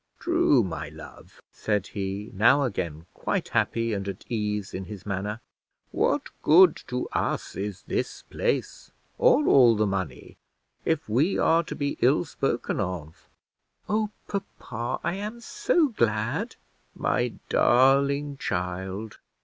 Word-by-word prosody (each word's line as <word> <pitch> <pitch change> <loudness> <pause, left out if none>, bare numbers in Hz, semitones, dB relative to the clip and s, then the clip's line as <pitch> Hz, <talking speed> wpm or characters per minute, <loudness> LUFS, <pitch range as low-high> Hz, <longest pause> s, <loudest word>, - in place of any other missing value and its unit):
"True, 340 - +3
my 80 -4 -4
love," 80 0 -13
said 105 -3 -1
he, 100 +1 -5
now 115 +8 +5
again 85 - -3
quite - - -2
happy 115 -1 0
and 100 -1 -3
at 95 -2 -6
ease 105 -3 -2
in 95 0 -4
his 100 -1 -9
manner. 105 +3 -3 0.5
"What - - 0
good 175 +2 +7
to 125 0 -2
us - - -2
is 100 -1 -5
this - - -3
place 480 -2 -2 0.3
or 485 -11 +5
all 120 -4 +6
the 110 0 +2
money, 95 -4 -4 0.5
if 160 -1 0
we 140 - +2
are 165 +1 +3
to - - -6
be 140 -1 -2
ill 140 +7 +4
spoken 135 -5 -2
of?" 90 -5 -5 0.6
"Oh, 215 0 +1 0.2
papa, 120 - -4
I 170 - +1
am 210 +4 -5
so 345 - +1
glad!" 110 - -1 0.4
"My - - 0 0.2
darling 140 +3 +3
child! 95 +2 -4
115 Hz, 135 wpm, -26 LUFS, 95-150 Hz, 0.6 s, good